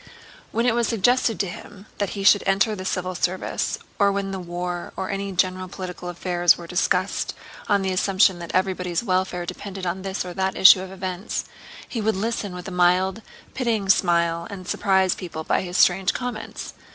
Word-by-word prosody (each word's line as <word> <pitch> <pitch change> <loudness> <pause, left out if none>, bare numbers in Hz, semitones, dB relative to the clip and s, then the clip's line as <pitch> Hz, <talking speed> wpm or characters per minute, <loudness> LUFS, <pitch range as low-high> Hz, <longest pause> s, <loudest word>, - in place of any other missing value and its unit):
When 230 +1 0
it 245 - +3
was 235 0 +1
suggested 235 +1 +2
to 195 - -2
him 195 +3 -10
that 200 0 -2
he 195 - -3
should 205 0 +6
enter 200 +3 +3
the 185 -1 -7
civil 185 -1 -2
service, 180 +1 -1 0.2
or 200 -1 +4
when 195 0 -2
the 190 - -4
war 175 0 -5
or 190 +2 -3
any 195 0 -3
general 185 0 0
political 180 -1 -7
affairs 175 -1 +2
were 175 - -9
discussed 180 +2 0 0.3
on 200 -2 +3
the 190 - 0
assumption 190 0 +3
that 170 -1 -7
everybody's 185 -1 0
welfare 185 -3 0
depended 195 +1 -6
on 180 +2 -2
this 190 -1 -3
or 180 - -6
that 190 +1 -1
issue 190 0 +8
of 190 0 -7
events, 185 +1 -4 0.4
he 230 - -3
would 220 0 +1
listen 205 -2 -2
with 180 0 -7
a - - -5
mild 180 +2 +3
and 225 - -19
pitying 225 -6 -1
smile 170 -2 +2
and 185 -3 -8
surprise 190 -2 +2
people 160 -3 -6
by - - +1
his 180 0 -4
strange 185 +1 +4
comments. 245 -3 -5
190 Hz, 190 wpm, -23 LUFS, 180-200 Hz, 0.4 s, issue